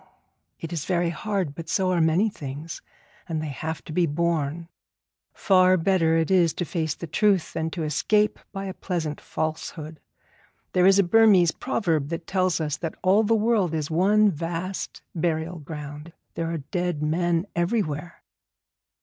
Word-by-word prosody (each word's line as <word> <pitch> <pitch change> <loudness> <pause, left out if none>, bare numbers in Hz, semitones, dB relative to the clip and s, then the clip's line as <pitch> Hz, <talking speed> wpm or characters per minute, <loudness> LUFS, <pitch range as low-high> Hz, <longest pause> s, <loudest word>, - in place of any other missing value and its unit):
It 165 +1 -6
is 155 -3 -3
very 175 -2 +1
hard, 190 -5 -2
but 165 +2 -8
so 185 0 +1
are 175 -2 +2
many 160 +7 +3
things, 155 -5 -7 0.5
and 160 -1 -1
they 155 -1 -4
have 160 +3 -5
to 155 - -8
be 175 +1 +2
borne. 165 0 -1 0.6
Far 185 -2 +4
better 165 -2 +2
it 165 +2 0
is 175 -4 +4
to 175 - -2
face 160 -3 -2
the - - -7
truth 190 +3 +1
than 160 0 -2
to 165 0 -4
escape 210 +8 +1
by 195 -1 -5
a 190 - -4
pleasant 165 -6 -3
falsehood. 155 0 -4 0.7
There 180 0 +4
is 195 0 +6
a 200 - +5
Burmese 190 -3 +5
proverb 165 - -1
that 165 0 -4
tells 185 -2 +1
us 150 -2 -2
that 165 +1 -4
all 190 +3 +5
the 225 +1 +2
world 210 -6 +1
is 155 0 -3
one 205 +5 +4
vast 170 +3 -4
burial 165 0 -1
ground; 150 +1 -8 0.2
there 165 0 -3
are 165 - -2
dead 170 +1 -3
men 170 +2 +1
everywhere.' 170 -3 -2
170 Hz, 165 wpm, -25 LUFS, 155-185 Hz, 0.7 s, is